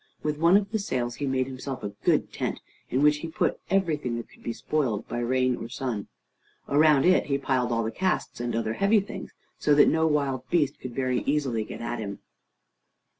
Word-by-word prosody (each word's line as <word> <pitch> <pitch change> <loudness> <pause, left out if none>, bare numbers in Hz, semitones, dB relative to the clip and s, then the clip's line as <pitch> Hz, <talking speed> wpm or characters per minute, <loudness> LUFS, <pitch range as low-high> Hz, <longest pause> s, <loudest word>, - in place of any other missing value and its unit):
With 150 0 -1
one 170 +4 +6
of 200 -1 -2
the 220 - 0
sails 120 -10 -2
he 145 - -2
made 130 -1 +1
himself 130 0 -6
a 105 - -2
good - - +2
tent, - - -2 0.3
in 130 +3 +1
which 150 0 +5
he 165 - -5
put 160 - -1
everything 155 -11 0
that 115 - -7
could - - -20
be - - -3
spoiled 115 -1 -1
by 120 - -3
rain 130 +1 +1
or 115 - -7
sun. 120 -5 -3 0.6
Around 150 -1 +5
it 185 +1 +4
he 140 -1 +1
piled 130 -3 0
all 115 0 +1
the 110 - -2
casks 185 -4 -1
and 120 -1 -2
other 115 -1 -1
heavy 200 - +3
things, 195 -1 -7 0.3
so 150 - +3
that 145 - +7
no 160 0 +2
wild 135 -4 0
beast 145 -3 +1
could 125 -2 -7
very 130 -2 +1
easily 135 -6 +1
get - - -8
at 120 +1 -3
him. 100 -2 -5
135 Hz, 210 wpm, -27 LUFS, 120-150 Hz, 0.6 s, that